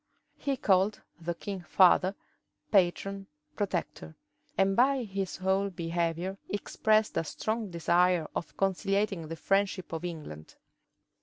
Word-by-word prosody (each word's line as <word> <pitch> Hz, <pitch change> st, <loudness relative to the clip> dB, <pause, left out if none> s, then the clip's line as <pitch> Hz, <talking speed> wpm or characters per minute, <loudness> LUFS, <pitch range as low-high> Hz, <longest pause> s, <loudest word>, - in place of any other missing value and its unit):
He 275 Hz, -2 st, -1 dB
called 195 Hz, -1 st, +2 dB, 0.2 s
the 170 Hz, +1 st, -3 dB
king 195 Hz, +1 st, -5 dB
"father," 185 Hz, +2 st, +4 dB, 0.6 s
"patron," 195 Hz, +1 st, +2 dB, 0.3 s
"protector;" 175 Hz, -, -3 dB, 0.4 s
and 195 Hz, 0 st, +3 dB
by 265 Hz, +2 st, +3 dB
his 195 Hz, -3 st, -4 dB
whole 190 Hz, +1 st, +1 dB
behavior 170 Hz, +1 st, -2 dB
expressed 215 Hz, +1 st, +1 dB
a -, -, +2 dB
strong 220 Hz, +6 st, -3 dB
desire 175 Hz, 0 st, +2 dB
of -, -, -5 dB
conciliating 195 Hz, -2 st, 0 dB
the 165 Hz, -, -5 dB
friendship 195 Hz, 0 st, 0 dB
of 165 Hz, +1 st, -4 dB
England. 150 Hz, -, -7 dB
190 Hz, 120 wpm, -30 LUFS, 170-200 Hz, 0.6 s, father